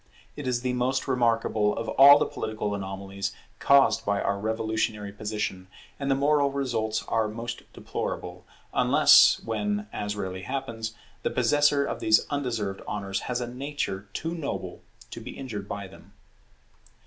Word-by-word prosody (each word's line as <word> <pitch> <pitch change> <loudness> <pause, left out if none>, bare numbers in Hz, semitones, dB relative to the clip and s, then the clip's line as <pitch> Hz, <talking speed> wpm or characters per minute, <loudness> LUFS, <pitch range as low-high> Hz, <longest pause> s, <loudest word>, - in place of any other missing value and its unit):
It 145 -3 -6
is 120 -1 0
the 125 0 -1
most 125 +3 0
remarkable 115 -4 +1
of 115 - -3
all 140 +2 +9
the - - +1
political 110 -2 -3
anomalies 100 0 -4 0.3
caused 140 -1 +4
by 100 0 0
our 100 0 -1
revolutionary 110 -1 -2
position; 105 -3 -4 0.3
and 140 -1 -2
the 135 - +4
moral 140 0 +2
results 115 -6 -1
are 110 -1 +1
most 115 +2 -7
deplorable, - - -5 0.3
unless - - +6
when, 205 - -2
as 105 0 -3
rarely 95 -2 -4
happens, 115 -2 -4 0.3
the - - 0
possessor 145 -1 +3
of - - -4
these 110 0 +4
undeserved 115 -9 -2
honours 100 -2 -3
has 125 0 -1
a 120 - -3
nature 125 -6 -4
too 165 +9 -3
noble 160 -4 -5 0.3
to - - -7
be - - -8
injured 105 -7 -6
by 100 -1 -4
them. 95 - -17
115 Hz, 150 wpm, -27 LUFS, 105-135 Hz, 0.3 s, all